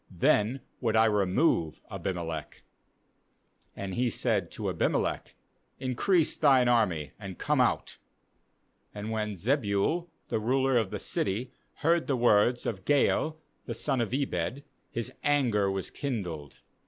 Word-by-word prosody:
then 105 +8 +2 0.2
would 115 -3 0
I 110 0 +6
remove 100 - +1
Abimelech.' 85 -5 -4 1.1
And 100 -1 -5
he 125 +4 +1
said - - 0
to - - -4
Abimelech: - - -1 0.4
'Increase 150 +7 +1
thine 135 -5 +5
army, 90 - +2
and 95 -3 -7
come - - +1
out.' - - 0 1.0
30And 105 +2 -5
when 105 -2 -2
Zebul 120 - 0 0.2
the - - 0
ruler 130 +4 +2
of 115 -2 +2
the - - -4
city 110 +6 -2 0.3
heard 170 0 +3
the 135 - +1
words 120 +1 +3
of 95 -4 -3
Gaal 150 +3 +2 0.3
the - - -3
son 135 -4 0
of 115 - -2
Ebed, 130 -2 -2 0.3
his 120 +2 -4
anger 120 -9 +2
was 95 -1 -3
kindled. 90 - -5
115 Hz, 130 wpm, -29 LUFS, 100-135 Hz, 1.1 s, I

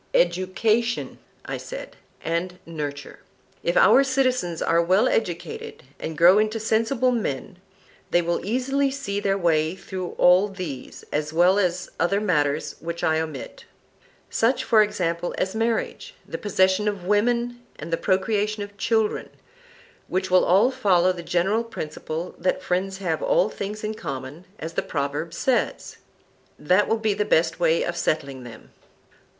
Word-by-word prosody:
Education, 230 - +1 0.3
I - - -4
said, - - -8 0.3
and 175 +2 -2
nurture: 145 -4 -6 0.4
If 170 +1 0
our 225 +8 +7
citizens 255 -10 0
are 170 +1 +2
well 185 +5 +3
educated, 455 -1 -3 0.2
and 160 -1 -5
grow 180 +4 +7
into 215 +1 0
sensible 230 +4 +1
men, 200 - -3 0.5
they 175 - +3
will 170 0 -1
easily 270 +6 0
see 265 -7 -3
their 195 -1 +1
way 160 -2 +1
through 185 -2 -6
all 180 +3 +5
these, 180 -10 -7
as 150 +1 -1
well 180 +5 +4
as 180 -1 0
other 185 +4 +2
matters 150 -7 0
which 170 0 -5
I 160 0 +2
omit; 155 -4 -6 0.6
such, 235 +4 +1
for 220 -2 +5
example, 175 -5 -1
as 190 - -1
marriage, 230 - -2
the - - -5
possession 190 0 +2
of 200 -4 -2
women 240 +4 +1 0.2
and 165 - -6
the - - +5
procreation 205 +3 0
of 205 0 -11
children, 220 0 0 0.8
which 185 0 -2
will 185 - +5
all 205 +8 +4
follow 185 -6 +3
the 180 -1 -6
general 185 +7 +1
principle 165 -5 -6
that 185 - 0
friends 190 +2 -1
have 195 - -2
all - - +2
things 210 +2 -6
in 215 0 -2
common, 135 -1 -7
as 165 +1 -6
the - - 0
proverb 145 +2 -3
says. 245 +9 -1 0.6
That 180 +7 +2
will 225 - +1
be 220 -1 0
the 210 - 0
best 170 -5 +2
way 165 -1 +3
of 175 - -3
settling 140 -6 -2
them. 120 -2 -12
190 Hz, 150 wpm, -24 LUFS, 170-220 Hz, 0.8 s, our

